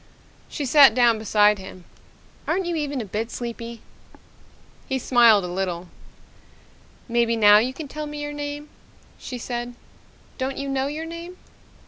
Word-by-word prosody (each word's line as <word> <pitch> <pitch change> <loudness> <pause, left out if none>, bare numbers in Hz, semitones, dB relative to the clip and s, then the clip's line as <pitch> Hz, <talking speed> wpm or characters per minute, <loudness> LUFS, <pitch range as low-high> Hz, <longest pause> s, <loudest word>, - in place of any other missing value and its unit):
She 290 - -4
sat 270 -3 +7
down 240 -3 +4
beside 210 -1 +3
him. 185 -2 -11 0.6
"Aren't 380 0 0
you 345 -1 -2
even 290 -4 -2
a - - -6
bit 215 +4 -4
sleepy?" 235 -1 -7 1.1
He 265 - 0
smiled 235 -5 +5
a - - -4
little. 180 -1 -4 1.2
"Maybe 235 -1 +1
now 210 -2 +7
you 245 +4 0
can 290 +3 -8
tell 300 +2 -6
me 295 0 -7
your 295 0 -5
name," 290 0 -6 0.5
she 250 - -7
said. 240 0 -5 0.6
"Don't 265 +1 -3
you 275 0 -4
know 270 0 -1
your 305 +3 -5
name?" 335 +2 -8
245 Hz, 150 wpm, -23 LUFS, 220-290 Hz, 1.2 s, sat